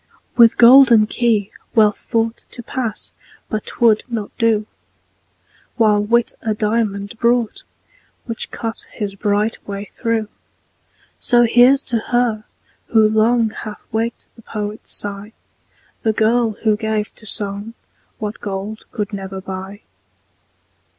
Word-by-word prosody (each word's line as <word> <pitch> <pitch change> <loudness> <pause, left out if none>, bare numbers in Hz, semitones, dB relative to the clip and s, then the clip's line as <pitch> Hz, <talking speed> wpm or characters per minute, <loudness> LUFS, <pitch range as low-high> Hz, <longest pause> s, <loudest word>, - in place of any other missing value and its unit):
With 230 -2 +6
golden 240 -2 +8
key 215 -3 0 0.2
Wealth 215 -2 +4
thought 225 0 -2
To 240 - -9
pass 230 -3 -4 0.4
but 215 - -3
'twould 225 -3 +3
not 225 -4 -5
do: 225 -2 +2 1.1
While 210 -3 +3
Wit 235 +3 +2
a 220 -1 -1
diamond 210 -1 -1
brought, 235 -1 +1 0.6
Which 230 -2 -4
cut 225 -1 -5
his 205 -3 -4
bright 205 +2 0
way 200 0 -5
through. 230 -1 -2 0.9
So 240 0 +4
here's 245 +4 +5
to 235 -3 0
her, 230 -2 0 0.4
who 220 -2 +4
long 220 +1 +2
Hath 215 -1 -8
waked 225 +1 -2
the 230 - -15
poet's 210 -1 -6
sigh, 205 +1 -3 0.7
The 220 - +1
girl, 225 +1 +2
who 215 -2 +3
gave 215 -1 -2
to 215 - -11
song 205 +2 -3 0.4
What 210 0 -5
gold 200 +2 -5
could 210 -2 -4
never 195 -1 -5
buy. 190 +2 -7
220 Hz, 125 wpm, -19 LUFS, 210-230 Hz, 1.1 s, golden